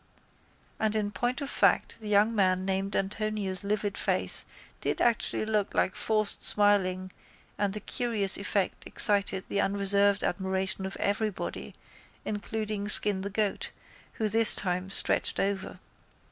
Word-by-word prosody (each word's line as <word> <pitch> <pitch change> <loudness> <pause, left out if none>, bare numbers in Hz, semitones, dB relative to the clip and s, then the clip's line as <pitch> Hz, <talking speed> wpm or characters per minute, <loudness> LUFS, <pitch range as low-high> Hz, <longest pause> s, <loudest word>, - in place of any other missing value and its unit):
And 220 0 0
in 205 -1 -1
point 245 +6 -2
of 280 - -4
fact - - +2
the 215 -2 -7
young 210 +2 +4
man 185 -3 +2
named 195 +1 -1
Antonio's 200 -1 -2
livid 205 0 -1
face - - 0 0.3
did - - -2
actually 230 -2 +1
look 215 -2 -1
like 185 - +1
forced 215 -2 -1
smiling 185 -3 +1 0.4
and 200 -1 -1
the 210 - -4
curious 210 -3 -1
effect 200 -1 -2
excited 200 -3 +3
the 200 - 0
unreserved 200 0 +2
admiration 190 +1 -2
of 190 - -6
everybody 205 0 -2 0.5
including 210 -1 -3
Skin 205 -2 +6
the 200 - -4
Goat, 205 0 -1 0.4
who 220 - -1
this 225 +1 +4
time 180 0 -2
stretched 195 - +2
over. 195 -1 -2
200 Hz, 135 wpm, -28 LUFS, 195-215 Hz, 0.5 s, Skin